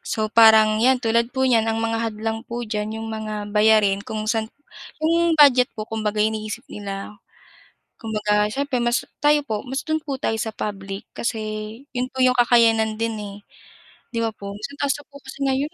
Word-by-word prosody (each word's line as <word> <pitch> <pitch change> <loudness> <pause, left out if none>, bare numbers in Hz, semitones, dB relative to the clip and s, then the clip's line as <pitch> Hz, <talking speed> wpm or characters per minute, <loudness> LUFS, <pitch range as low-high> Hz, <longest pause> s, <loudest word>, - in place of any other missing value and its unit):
So 215 0 -3
parang 220 -1 +6
'yan, 255 +2 +4
tulad 235 0 +1
po 260 +1 -1
niyan 230 -3 +3
ang 225 - 0
mga 225 0 -1
hadlang 220 +1 -4
po 240 0 -4
diyan 215 0 -3
'yong 225 0 -5
mga 215 -1 -4 0.2
bayarin 210 -2 +4
kung 215 +1 -5
saan 220 0 -1 0.6
'yong 335 0 +3
budget 265 -4 +6
po 215 - -4
kumbaga 215 -1 -3
iniisip 220 +2 -3
nila. 200 0 -6 0.9
Kumbaga 210 -1 0
siyempre 270 -2 -1
mas 240 0 0 0.2
tayo 295 0 +5
po 215 -1 -3
mas 265 +1 -3
do'n 315 0 -1
po 275 -4 -4
tayo 225 - -1
sa 220 0 -3
public 195 -2 -6
kasi 230 -1 -2 0.6
yun 250 +1 -2
po 260 - -8
yung 255 -1 +4
kakayanan 225 -3 +3
din, 230 0 -1
eh, 205 -2 -7 0.8
'di 230 - 0
ba 225 - 0
po? 200 -1 -8
Sobrang 280 +8 -8
taas 285 -1 +1
na 290 - -10
po 280 - -12
kasi - - -11
ngayon, 275 +4 0
225 Hz, 185 wpm, -22 LUFS, 215-255 Hz, 0.9 s, parang